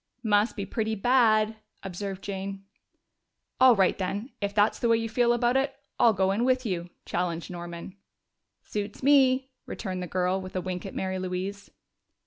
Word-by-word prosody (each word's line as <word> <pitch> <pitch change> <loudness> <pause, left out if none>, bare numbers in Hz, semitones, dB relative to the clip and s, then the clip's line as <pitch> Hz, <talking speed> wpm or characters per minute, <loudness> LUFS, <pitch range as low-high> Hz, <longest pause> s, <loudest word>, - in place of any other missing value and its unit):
"Must 210 0 +2
be 200 -3 -3
pretty 220 +2 -2
bad," 220 -1 +3 0.3
observed 195 +1 -5
Jane. 195 0 -5 0.9
"All 255 -2 +7
right, 190 -3 +3
then, 200 +7 -3
if 200 0 -1
that's 210 +1 +3
the 235 - +1
way 230 - +5
you 225 0 -2
feel 240 +1 +2
about 240 +1 +2
it, 270 +1 +1 0.2
I'll 230 - +6
go 190 -1 +1
in 210 +4 0
with 255 0 +2
you!" 175 -4 -3 0.2
challenged 170 -1 -2
Norman. 175 +1 -7 0.7
"Suits 205 +3 -5
me," 265 -1 +4 0.2
returned 185 -4 -4
the 180 - -4
girl, 185 +2 0
with 185 0 -9
a 185 - 0
wink 180 +1 -4
at - - -9
Mary 190 0 -2
Louise. 185 +2 -4
200 Hz, 170 wpm, -27 LUFS, 185-230 Hz, 0.9 s, All